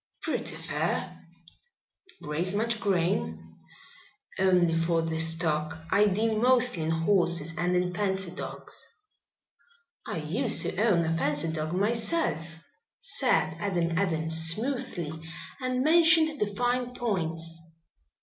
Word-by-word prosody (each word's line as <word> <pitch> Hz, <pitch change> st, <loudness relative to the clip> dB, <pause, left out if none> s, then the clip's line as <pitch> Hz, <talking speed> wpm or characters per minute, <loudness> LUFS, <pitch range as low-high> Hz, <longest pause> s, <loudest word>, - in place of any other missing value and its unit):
"Pretty -, -, -3 dB
fair." -, -, -3 dB, 1.0 s
"Raise 170 Hz, +6 st, -2 dB
much 225 Hz, +1 st, 0 dB
grain?" 80 Hz, -, -1 dB, 0.8 s
"Only 180 Hz, -3 st, +3 dB
for 165 Hz, 0 st, +1 dB
the 160 Hz, 0 st, -2 dB
stock. 160 Hz, -1 st, 0 dB
I 210 Hz, +1 st, +4 dB
deal 215 Hz, +2 st, 0 dB
mostly 250 Hz, -6 st, +4 dB
in 160 Hz, -, -1 dB
horses 165 Hz, -1 st, +1 dB
and 180 Hz, +1 st, 0 dB
in 180 Hz, 0 st, 0 dB
fancy 190 Hz, -1 st, -1 dB
dogs." -, -, -6 dB, 1.2 s
"I -, -, -3 dB
used -, -, +1 dB
to -, -, -3 dB
own 180 Hz, -7 st, +3 dB
a 165 Hz, 0 st, 0 dB
fancy 150 Hz, 0 st, 0 dB
dog 155 Hz, 0 st, -3 dB
myself," 220 Hz, -, 0 dB, 0.6 s
said -, -, 0 dB
Adam 175 Hz, -4 st, -1 dB
Adams 160 Hz, -3 st, 0 dB
smoothly 225 Hz, -, 0 dB, 0.5 s
and 255 Hz, -1 st, -1 dB
mentioned 320 Hz, -1 st, +5 dB
the 210 Hz, -, +1 dB
fine 245 Hz, +4 st, -1 dB
points. 165 Hz, -8 st, -2 dB
180 Hz, 115 wpm, -28 LUFS, 165-225 Hz, 1.2 s, mentioned